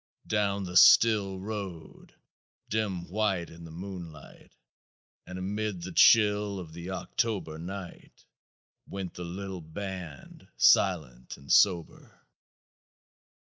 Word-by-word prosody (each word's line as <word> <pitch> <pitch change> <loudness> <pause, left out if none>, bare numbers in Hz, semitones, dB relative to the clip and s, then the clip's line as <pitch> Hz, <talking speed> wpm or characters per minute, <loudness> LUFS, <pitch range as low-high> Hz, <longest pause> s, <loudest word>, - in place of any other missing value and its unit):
"Down 100 -1 0
the 90 -1 -1
still 100 0 +6
road, 95 -5 -8 0.5
dim 100 -5 -2
white 95 -3 -1
in 85 0 -12
the 80 - -11
moonlight, 85 -3 -10 0.8
and 90 - -7
amid 100 -1 -3
the 90 - -6
chill 105 +1 +4
of 80 -3 -9
the 85 +2 -8
October 95 -4 -3
night, 95 +1 -9 0.6
went 95 -2 -6
the 90 - -7
little 95 +1 -6
band, 90 -2 -8
silent 75 -11 +2
and 70 - -9
sober." 90 -5 +2
95 Hz, 105 wpm, -28 LUFS, 85-100 Hz, 0.8 s, still